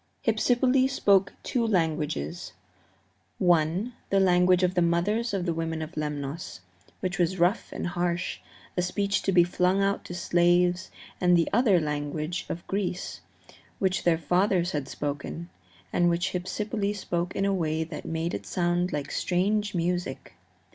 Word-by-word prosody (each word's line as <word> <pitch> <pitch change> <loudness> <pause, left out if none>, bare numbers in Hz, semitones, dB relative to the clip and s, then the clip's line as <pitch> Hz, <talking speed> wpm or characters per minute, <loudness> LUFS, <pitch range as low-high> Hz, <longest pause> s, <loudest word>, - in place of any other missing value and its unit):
Hypsipyle 250 +4 +3
spoke 200 -7 +3
two 245 - 0
languages 165 -3 -1 0.8
one, 175 +5 +2 0.2
the 195 - +3
language 180 -1 +4
of 180 0 +2
the 180 - +2
mothers 195 +8 +1
of 195 -3 -1
the 170 - 0
women 160 -1 -2
of 155 +3 -9
Lemnos, 150 - -4 0.4
which 180 -1 -2
was 175 +2 +1
rough 180 +5 +1
and - - -4
harsh, 175 0 -1 0.4
a 180 - +1
speech 200 +2 0
to 195 - 0
be 180 -2 +6
flung 180 +2 +1
out 200 0 0
to 175 - -6
slaves, 175 +1 +2 0.3
and 180 -1 +5
the 165 - +2
other 215 -5 +4
the 155 - -2
language 150 +3 -3
of 170 - -5
Greece, 190 -2 -3 0.6
which 190 -1 0
their 170 -2 +3
fathers 180 +2 +1
had 145 -3 -3
spoken, 115 - -5 0.4
and 175 0 +3
which 175 +2 0
Hypsipyle 205 +3 -2
spoke 175 -2 -3
in 195 - +1
a 200 - +2
way 160 -3 0
that 160 -1 -7
made 165 +1 -2
it - - -5
sound 175 0 0
like 145 -1 -3
strange 205 +3 0
music. 175 - -2
175 Hz, 155 wpm, -27 LUFS, 165-195 Hz, 0.8 s, be